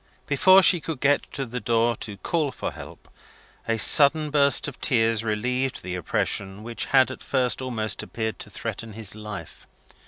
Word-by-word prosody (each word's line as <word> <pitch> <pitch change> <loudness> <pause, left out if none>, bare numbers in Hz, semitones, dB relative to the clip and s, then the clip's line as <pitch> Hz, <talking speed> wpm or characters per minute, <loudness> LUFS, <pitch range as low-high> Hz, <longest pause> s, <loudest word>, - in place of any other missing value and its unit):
Before 185 +7 +5
she 175 -3 +4
could 155 -3 -5
get 145 +1 +1
to 135 - -3
the 125 +1 -5
door 115 +1 +1
to 105 -3 -7
call 150 - -1
for - - -5
help, - - -12 0.6
a 115 - 0
sudden 150 +6 +5
burst 140 -1 +4
of 145 - -9
tears 115 -3 +1
relieved 125 +4 -2
the 90 0 -5
oppression 95 +3 -3
which 115 0 -5
had 130 -2 +4
at - - -9
first 130 -1 0
almost 115 -4 -2
appeared 110 -1 -5
to - - -9
threaten 115 -1 -6
his 110 -2 -4
life. 105 -6 -9
120 Hz, 175 wpm, -24 LUFS, 110-140 Hz, 0.6 s, Before